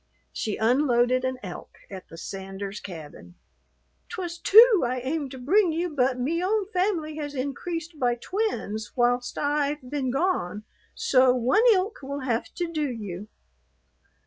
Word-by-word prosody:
She 215 Hz, -, -3 dB
unloaded 250 Hz, +1 st, +3 dB
an 260 Hz, 0 st, -1 dB
elk 180 Hz, -3 st, -9 dB
at 190 Hz, -2 st, -8 dB
the 165 Hz, -, -11 dB
Sanders 195 Hz, +2 st, -6 dB
cabin. 170 Hz, -1 st, -10 dB, 0.7 s
"'Twas 345 Hz, -2 st, -5 dB
two 445 Hz, +1 st, +7 dB
I 250 Hz, +1 st, 0 dB
aimed 280 Hz, +3 st, -2 dB
to 260 Hz, -, -9 dB
bring 350 Hz, +9 st, +3 dB
you, 340 Hz, +3 st, -1 dB
but 255 Hz, -1 st, +2 dB
me 330 Hz, +8 st, 0 dB
own 415 Hz, +2 st, +1 dB
family 360 Hz, -5 st, -1 dB
has 290 Hz, -1 st, -5 dB
increased 325 Hz, +4 st, -4 dB
by 245 Hz, -1 st, +2 dB
twins 235 Hz, -, -3 dB
whilst 245 Hz, 0 st, +1 dB
I've 290 Hz, -2 st, -1 dB
been 270 Hz, -1 st, -2 dB
gone, 250 Hz, -, -1 dB, 0.3 s
so 255 Hz, -1 st, +4 dB
one 255 Hz, -, +3 dB
ilk 395 Hz, +1 st, +1 dB
will 280 Hz, +1 st, -5 dB
have 240 Hz, -3 st, -2 dB
to 345 Hz, -2 st, -3 dB
do 300 Hz, -3 st, 0 dB
you." 205 Hz, -5 st, -6 dB
265 Hz, 145 wpm, -26 LUFS, 240-335 Hz, 0.7 s, two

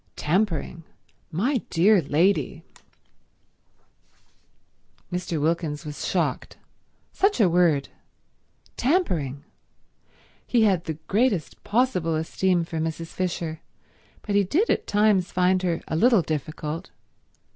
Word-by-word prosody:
"Tampering! 170 Hz, -1 st, -1 dB, 0.5 s
My 235 Hz, -, 0 dB
dear 190 Hz, +3 st, +4 dB
lady—" 165 Hz, +7 st, +1 dB, 2.5 s
Mr. 175 Hz, -3 st, -2 dB
Wilkins 160 Hz, 0 st, -1 dB
was 150 Hz, -1 st, -5 dB
shocked. -, -, -2 dB, 0.6 s
Such 400 Hz, -4 st, +1 dB
a 210 Hz, -, +5 dB
word. 170 Hz, -5 st, +2 dB, 0.9 s
Tampering. 175 Hz, -, 0 dB, 1.0 s
He 235 Hz, -3 st, +3 dB
had 190 Hz, -5 st, +2 dB
the 160 Hz, -, -3 dB
greatest 205 Hz, -, 0 dB
possible 205 Hz, -8 st, +1 dB
esteem 175 Hz, +2 st, 0 dB
for 165 Hz, -1 st, -5 dB
Mrs. 165 Hz, +1 st, -3 dB
Fisher, 170 Hz, -3 st, -3 dB, 0.6 s
but 205 Hz, -, -3 dB
he 200 Hz, 0 st, +4 dB
did 330 Hz, -, +1 dB
at -, -, -1 dB
times 205 Hz, -3 st, +2 dB
find 185 Hz, 0 st, +2 dB
her 175 Hz, -3 st, -1 dB
a -, -, -2 dB
little 225 Hz, +1 st, +4 dB
difficult. 155 Hz, +2 st, -4 dB
180 Hz, 105 wpm, -25 LUFS, 160-205 Hz, 2.5 s, a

